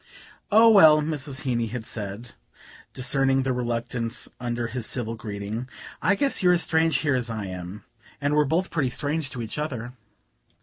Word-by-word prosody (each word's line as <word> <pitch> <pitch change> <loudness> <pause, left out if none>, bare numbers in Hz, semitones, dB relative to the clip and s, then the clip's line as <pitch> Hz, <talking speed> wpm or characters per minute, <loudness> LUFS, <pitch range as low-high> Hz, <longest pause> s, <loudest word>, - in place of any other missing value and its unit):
"Oh, 220 +2 +7
well," 160 -9 +8
Mrs. 150 -3 -3
Heeny 120 -4 -1
had 120 0 -6
said, 105 +2 -6 0.6
discerning 135 0 +1
the 130 -1 0
reluctance 120 -1 -2
under 120 -1 -2
his 115 0 -4
civil 115 -3 -2
greeting, 110 +2 -5 0.3
"I 195 +4 +3
guess 275 +6 +1
you're 180 -1 +5
as 175 - +2
strange 160 0 +2
here 145 -3 +1
as 125 -2 -1
I 110 -3 -4
am, 90 +2 -7 0.4
and 145 0 0
we're 150 0 +4
both 165 +6 0
pretty 145 -6 0
strange 150 +3 -2
to 125 -2 -5
each 110 +6 -5
other. 125 -5 -4
130 Hz, 170 wpm, -25 LUFS, 115-150 Hz, 0.6 s, well